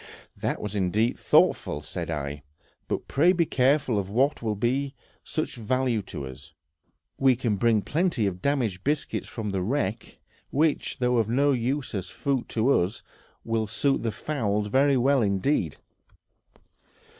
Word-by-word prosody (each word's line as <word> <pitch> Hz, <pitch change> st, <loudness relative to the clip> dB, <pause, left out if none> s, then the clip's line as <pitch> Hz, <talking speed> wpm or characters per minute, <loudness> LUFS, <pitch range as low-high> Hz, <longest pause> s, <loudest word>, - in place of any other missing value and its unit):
"That -, -, -2 dB
was 105 Hz, -1 st, -5 dB
indeed 105 Hz, +4 st, +1 dB
thoughtful," 75 Hz, -, +3 dB
said 85 Hz, +1 st, -5 dB
I; 75 Hz, -2 st, -4 dB, 0.5 s
"but -, -, -3 dB
pray 170 Hz, +6 st, +4 dB
be 170 Hz, -2 st, +2 dB
careful 130 Hz, -5 st, +2 dB
of 95 Hz, -1 st, -4 dB
what 135 Hz, +8 st, +1 dB
will 110 Hz, -2 st, -1 dB
be 135 Hz, +6 st, -1 dB
of 120 Hz, -, -34 dB
such 155 Hz, -5 st, -2 dB
value 120 Hz, 0 st, 0 dB
to 70 Hz, -7 st, -7 dB
us; 65 Hz, +2 st, -11 dB, 0.7 s
we 135 Hz, -2 st, +5 dB
can 115 Hz, -3 st, 0 dB
bring 110 Hz, 0 st, +2 dB
plenty 150 Hz, -, 0 dB
of 90 Hz, -2 st, -2 dB
damaged 120 Hz, -9 st, 0 dB
biscuits 150 Hz, +1 st, -1 dB
from 105 Hz, -3 st, -4 dB
the 95 Hz, -1 st, -1 dB
wreck, 110 Hz, 0 st, -2 dB, 0.3 s
which, 155 Hz, +2 st, 0 dB
though 125 Hz, -1 st, +1 dB
of 110 Hz, -2 st, +1 dB
no 140 Hz, +4 st, +3 dB
use 130 Hz, +2 st, -1 dB
as 95 Hz, -3 st, -3 dB
food 130 Hz, +1 st, -2 dB
for 115 Hz, -3 st, +3 dB
us, 100 Hz, +7 st, -5 dB, 0.4 s
will 115 Hz, -1 st, -1 dB
suit 135 Hz, +6 st, +1 dB
the 115 Hz, -, -1 dB
fowls 105 Hz, -7 st, -2 dB
very 135 Hz, +3 st, +4 dB
well 135 Hz, +2 st, +3 dB
indeed." 100 Hz, -, +1 dB
120 Hz, 155 wpm, -26 LUFS, 100-135 Hz, 0.7 s, we